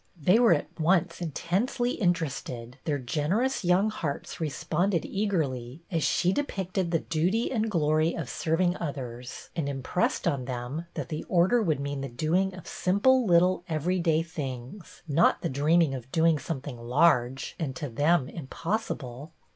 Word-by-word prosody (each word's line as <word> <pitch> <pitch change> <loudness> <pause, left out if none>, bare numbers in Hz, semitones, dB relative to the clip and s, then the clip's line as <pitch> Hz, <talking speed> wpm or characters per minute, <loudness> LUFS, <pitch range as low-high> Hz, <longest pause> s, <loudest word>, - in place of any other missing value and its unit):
They 180 +9 +4
were 230 -8 +6
at 150 - -6
once 175 +2 +2
in 170 - -2
tensely 220 - 0
interested; 140 - -2
their 150 -3 0
generous 160 - 0
young 185 +4 +3
hearts 145 -8 -4
responded 165 +4 0
eagerly 155 - -2
as 165 -2 0
she 180 +4 +2
depicted 190 -9 -2
the 165 - +2
duty 180 +8 0
and 225 -3 0
glory 155 -3 +2
of 165 -6 -4
serving 170 +7 0
others, 125 -5 -6
and 155 -4 -1
im 135 -2 -4
jjressed 180 - 0
on 130 -3 0
them 130 +6 -4
that - - -4
the 155 -2 -4
Order 185 +7 +3
would 160 -9 +1
mean 140 0 -3
the 135 - -4
doing 175 +10 0
of 180 - -11
simple, 235 +6 +2
little, 180 +1 +4
everyday 165 0 +1
things, 155 +3 -7
not 160 +3 +3
the 170 - 0
dreaming 150 +2 +3
of 130 0 -7
doing 160 -2 +3
something 140 -4 -5
large 125 0 +2
and 140 -6 -3
to 145 - -4
them 145 +3 +2
impossible. 155 - -4
165 Hz, 155 wpm, -28 LUFS, 140-180 Hz, -, were